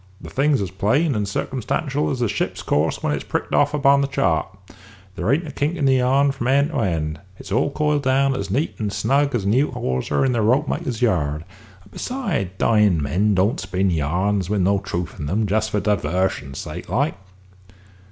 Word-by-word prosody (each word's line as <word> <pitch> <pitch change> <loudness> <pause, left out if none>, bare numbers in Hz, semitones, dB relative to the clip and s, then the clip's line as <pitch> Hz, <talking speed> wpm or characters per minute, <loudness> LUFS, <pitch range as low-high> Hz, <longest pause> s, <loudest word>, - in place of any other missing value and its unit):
The - - -10
thing's 140 -3 +2
as 95 - -5
plain 135 - +1
and 105 -3 -1
circumstantial 135 +7 -2
as 125 - -2
the 120 - +2
ship's 105 0 -3
course 75 +2 0
when 75 - +1
it's 75 - -3
pricked - - -3
off - - +3
upon 140 -1 +4
the 140 - +1
chart. 135 - +1 0.7
There 90 +7 0
ain't 160 +4 +1
a - - -6
kink 145 +4 -1
in 155 -5 -1
the 135 -1 +4
yarn 135 +3 +3
from 130 -3 -4
end 140 +4 +3
to 150 - -1
end; 80 -7 -1 0.2
it's 95 - -11
all 115 - +2
coiled 150 0 0
down 135 0 +2
as 100 -5 -4
neat 140 - 0
and 105 -2 -2
snug 140 +7 +1
as 105 -5 -1
a - - 0
new 130 +8 +3
hawser 65 - -1
in 130 - +2
the 120 -2 +1
ropemaker's 125 0 0
yard; 80 -8 0 0.4
and 100 - -21
besides, 200 - -2
dyin' 105 -7 +3
men 95 +9 +1
don't 95 +5 +2
spin 95 0 0
yarns 90 +5 0
with 105 -2 +1
no 100 +2 +2
truth 90 -2 -5
in 75 -1 -4
'em, 105 +5 +1
just 110 +2 0
for 105 - 0
divarsion's 90 -7 -1
sake, 80 +5 -7
like." 135 - +1
110 Hz, 200 wpm, -22 LUFS, 95-140 Hz, 0.7 s, upon